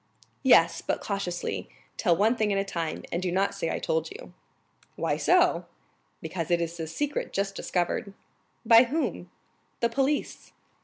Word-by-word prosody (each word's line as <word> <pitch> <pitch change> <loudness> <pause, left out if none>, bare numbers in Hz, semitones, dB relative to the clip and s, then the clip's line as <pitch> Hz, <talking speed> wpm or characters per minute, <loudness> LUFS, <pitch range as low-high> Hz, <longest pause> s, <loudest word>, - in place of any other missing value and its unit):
"Yes, - - +5
but - - -1
cautiously, 195 -4 -3 0.3
tell 175 -5 +2
one 220 +5 +3
thing 215 -3 0
at 200 - +1
a 195 - +1
time, 170 -5 -4
and 170 - -1
do 185 -1 -1
not 190 +2 +1
say 180 -5 -3
I - - -1
told 160 0 -1
you." - - -11 0.6
"Why - - 0
so?" - - +3 0.6
"Because 165 0 -4
it 175 -1 +3
is 170 0 -4
a 160 - -3
secret 290 - -3
just 195 0 -1
discovered." 190 +2 -2 0.5
"By 230 +2 +8
whom?" 240 - -2 0.5
"The 235 - +2
police." 275 +4 -1
195 Hz, 160 wpm, -27 LUFS, 170-225 Hz, 0.6 s, By